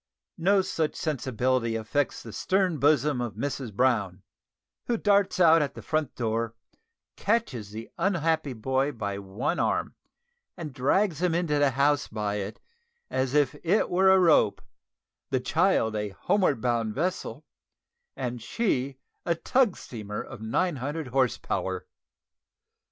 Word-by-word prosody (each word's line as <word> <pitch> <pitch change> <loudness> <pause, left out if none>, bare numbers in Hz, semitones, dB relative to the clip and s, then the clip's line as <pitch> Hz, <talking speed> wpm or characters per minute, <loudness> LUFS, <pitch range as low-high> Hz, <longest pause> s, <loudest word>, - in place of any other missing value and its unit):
No 195 +3 +4
such 160 -4 -1
sensibility 130 -5 0
affects 120 +6 -1
the 115 - -9
stern 185 - +1
bosom 145 -2 +3
of 120 -5 -4
Mrs 130 0 -3
Brown, 105 -5 +1 0.6
who 235 - +1
darts 200 -3 +2
out 165 -2 +6
at 145 - -2
the - - -9
front 155 -3 -1
door, 115 -1 -1 0.6
catches 195 - -1
the 110 +2 -7
unhappy 160 -6 +1
boy 130 +5 0
by 100 -3 -4
one 100 - -2
arm, - - 0 0.6
and 155 -5 -6
drags 160 +6 +1
him 180 -2 +2
into 160 -4 +1
the 145 -1 +4
house 140 +2 +2
by 105 -1 -2
it 100 +1 -5 0.5
as 130 +1 0
if 145 -2 +3
it 185 +6 +2
were 190 +2 +4
a 190 - +7
rope, 160 - +4 0.7
the 130 - +1
child 155 - +2
a 105 -1 -2
homeward 145 - +1
bound 115 -3 0
vessel, 175 +6 -3 0.7
and 125 -2 -4
she 135 - -1 0.3
a 170 - +1
tug 230 +5 +2
steamer 105 -3 -6
of - - -10
nine 150 +9 0
hundred 145 +2 -4
horse 130 -1 +2
power. 95 -1 -3
135 Hz, 140 wpm, -27 LUFS, 115-170 Hz, 0.7 s, a